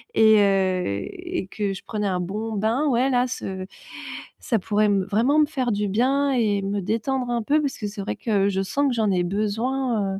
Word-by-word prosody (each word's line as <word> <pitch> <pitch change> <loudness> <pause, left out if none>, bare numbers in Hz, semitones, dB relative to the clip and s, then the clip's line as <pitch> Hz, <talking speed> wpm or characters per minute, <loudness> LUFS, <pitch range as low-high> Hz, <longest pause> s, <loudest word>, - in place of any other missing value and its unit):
et 220 -1 +6
heu 190 -2 +2 0.2
et 350 - -5
que 205 -2 -2
je 190 - -9
prenais 210 -2 -2
un 180 -2 0
bon 215 +5 -4
bain, 225 +8 0
ouais 255 +1 +2
là 250 0 +2
ce 190 -6 -5 0.7
ça 225 -4 0
pourrait 210 +2 +1
me 200 -2 +2
vraiment 235 +9 +2
me 300 - +6
faire 260 -6 -1
du 205 0 -1
bien 270 +7 +2
et 215 -6 +1
me 200 +1 -2
détendre 240 +6 -1
un 235 -1 0
peu 295 +7 +2
parce 285 -3 -2
que 210 - -4
c'est 205 0 -6
vrai 195 - -3
que 200 -4 +1
je 190 0 0
sens 280 +9 0
que 255 - +1
j'en 220 -3 +1
ai 180 -1 +1
besoin, 215 +2 -1
heu, 195 - -5
215 Hz, 220 wpm, -23 LUFS, 200-255 Hz, 0.7 s, et